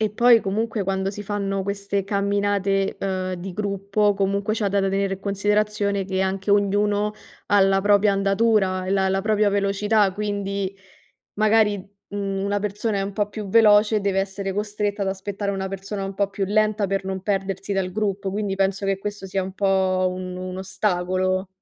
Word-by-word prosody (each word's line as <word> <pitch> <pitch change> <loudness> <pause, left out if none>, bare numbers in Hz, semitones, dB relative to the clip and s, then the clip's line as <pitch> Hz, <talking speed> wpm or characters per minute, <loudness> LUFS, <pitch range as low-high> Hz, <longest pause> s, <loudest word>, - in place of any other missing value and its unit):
E 215 -2 +1
poi 235 +1 +5
comunque 215 +2 -1
quando 190 0 -1
si 205 0 -7
fanno 200 -1 -2
queste 200 0 -2
camminate, 200 0 0
uhm, 185 -1 -2
di 180 +1 -7
gruppo 200 +1 0
comunque 200 +2 0
c'è 210 -2 0
da 200 0 +1
tenere 195 0 0
in 190 - -14
considerazione 205 0 0
che 190 0 -2
anche 190 +1 -2
ognuno 205 +1 +2 0.3
ha 205 -1 +4
la 195 0 +4
propria 205 0 +4
andatura 195 -1 +2
e - - -2
la 195 -1 +2
la 195 0 +1
propria 210 0 +2
velocità, 200 +1 +2
quindi 200 -1 -3 0.6
magari, 215 0 +3 0.3
mhmm, 195 -1 -3
una 200 0 0
persona 210 +1 -2
è - - 0
un 200 - -4
po' 205 0 -1
più 210 -1 -6
veloce 215 0 +5
e - - +1
deve 195 -1 0
essere 195 0 -3
costretta 205 0 -2
ad 195 - 0
aspettare 200 +1 -3
una 190 0 -3
persona 195 +1 -5
un 195 0 -5
po' 200 0 0
più 200 0 -2
lenta 215 0 +1
per 195 0 -2
non 190 0 -3
perdersi 195 -1 -2
dal 190 -2 -1
gruppo, 200 -1 -1
quindi 205 -1 -2
penso 195 0 0
che 195 -1 0
questo 205 -1 -5
sia 190 0 -1
un 190 0 -6
po' 190 -1 +1
un 185 0 -6
un 185 0 -5
ostacolo. 185 -1 -1
200 Hz, 185 wpm, -23 LUFS, 195-205 Hz, 0.6 s, poi